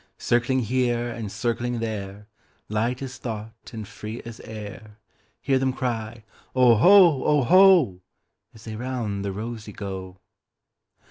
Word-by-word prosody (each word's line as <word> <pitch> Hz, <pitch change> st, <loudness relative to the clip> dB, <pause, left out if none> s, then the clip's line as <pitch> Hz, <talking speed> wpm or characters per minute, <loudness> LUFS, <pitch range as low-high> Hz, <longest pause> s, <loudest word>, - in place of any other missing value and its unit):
Circling 120 Hz, +2 st, +1 dB
here 120 Hz, 0 st, 0 dB
and 115 Hz, -3 st, -6 dB
circling 120 Hz, +2 st, -2 dB
there, 105 Hz, -2 st, -5 dB, 0.4 s
Light 115 Hz, +5 st, -1 dB
as 130 Hz, -1 st, -7 dB
thought 110 Hz, -1 st, -7 dB
and 110 Hz, -4 st, -7 dB
free 110 Hz, +4 st, -7 dB
as 115 Hz, -2 st, -9 dB
air, 105 Hz, 0 st, -9 dB, 0.4 s
Hear 135 Hz, -1 st, +1 dB
them 130 Hz, 0 st, 0 dB
cry, 115 Hz, -3 st, -4 dB, 0.3 s
"Oho, 135 Hz, -, +6 dB
oho,"As 150 Hz, -, +2 dB
they 110 Hz, -1 st, -7 dB
round 115 Hz, -4 st, -3 dB
the 100 Hz, -, -2 dB
rosey 110 Hz, +1 st, -6 dB
go. 95 Hz, -2 st, -7 dB
115 Hz, 120 wpm, -24 LUFS, 105-125 Hz, 0.4 s, Oho